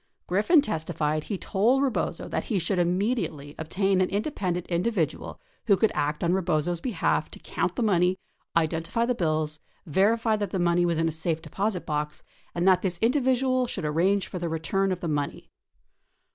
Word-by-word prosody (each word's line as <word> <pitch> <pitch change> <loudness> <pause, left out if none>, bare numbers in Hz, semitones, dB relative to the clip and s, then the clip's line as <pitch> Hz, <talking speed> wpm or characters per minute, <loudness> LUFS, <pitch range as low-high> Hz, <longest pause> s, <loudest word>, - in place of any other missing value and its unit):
Griffin 215 - +4
testified 155 - -2
he 205 - -3
told 230 +9 +2
Rebozo 265 -4 -1
that - - -2
he 215 - -1
should 180 +1 0
immediately 175 - -1
obtain 190 +4 +1
an 185 - +2
independent 190 - -2
individual 175 -1 -1 0.3
aa'Iio 200 -3 +5
could 220 - +3
act 150 +3 -1
on 170 +1 +2
Rebozo's 175 -2 0
behalf 240 -5 0
to - - -11
count - - -2
the 245 - 0
money, 185 -3 +3 0.4
identify 165 +7 0
the 250 - +1
bills, 155 -6 -1 0.3
verify 215 +7 +2
that 205 -2 -2
the 190 - -2
money 175 0 +2
was 170 -2 0
in 165 0 +2
a - - 0
safe 160 0 -1
deposit, 190 +4 -2
box, 150 0 -3 0.3
and 175 +2 +1
that 185 -1 +5
this 180 -3 -2
individual 255 +1 +2
should 185 -8 -4
arrange 185 +6 +2
for 180 - -6
the 170 -1 -2
re 165 - -1
turn 195 +4 0
of 180 - -3
the 170 - -2
money. 145 -2 -3
180 Hz, 180 wpm, -26 LUFS, 165-210 Hz, 0.4 s, aa'Iio